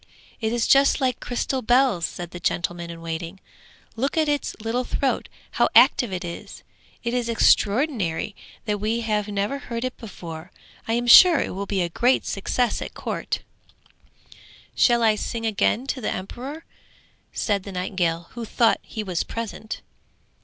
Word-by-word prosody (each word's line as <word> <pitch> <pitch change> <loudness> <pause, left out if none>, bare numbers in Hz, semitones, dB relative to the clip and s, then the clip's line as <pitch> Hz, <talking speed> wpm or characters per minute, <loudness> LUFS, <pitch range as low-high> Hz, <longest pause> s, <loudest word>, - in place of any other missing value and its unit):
'It 220 -1 -1
is 235 -1 +1
just 275 0 +5
like 255 -2 0
crystal 255 +2 -2
bells,' 245 -7 +3
said 175 -1 -8
the 175 - -7
gentleman 170 0 -2
in 165 0 -8
waiting. 165 +3 -5 0.6
'Look 270 +7 -1
at 315 -1 +3
its 290 -1 -1
little 225 +3 -1
throat, 270 +2 -1 0.2
how - - +2
active 240 -5 +6
it 180 -1 -4
is. 170 - -8 0.4
It 235 0 -2
is 245 -2 -1
extraordinary 210 - +2 0.3
that 210 -2 -1
we 220 +3 -1
have 210 -2 -1
never 205 +7 -2
heard 235 -4 -5
it 255 - -4
before! 170 -5 -9 0.4
I 225 - 0
am 240 +1 0
sure 330 +7 +9
it - - -2
will 200 +2 -4
be 190 -3 0
a 170 - -2
great 245 +9 +2
success 240 +5 -1
at - - -7
court!' - - -3 1.3
'Shall 240 -1 +4
I 220 -1 +5
sing 225 +2 -4
again 225 +3 +1
to 275 -1 -3
the 215 - -1
emperor?' 260 - -6 0.7
said 205 -3 0
the 200 - -8
nightingale, 180 -2 -2
who 235 - -6
thought 230 +1 +2
he 220 - -6
was 180 -4 -2
present. 220 -1 -6
220 Hz, 165 wpm, -24 LUFS, 185-245 Hz, 1.3 s, sure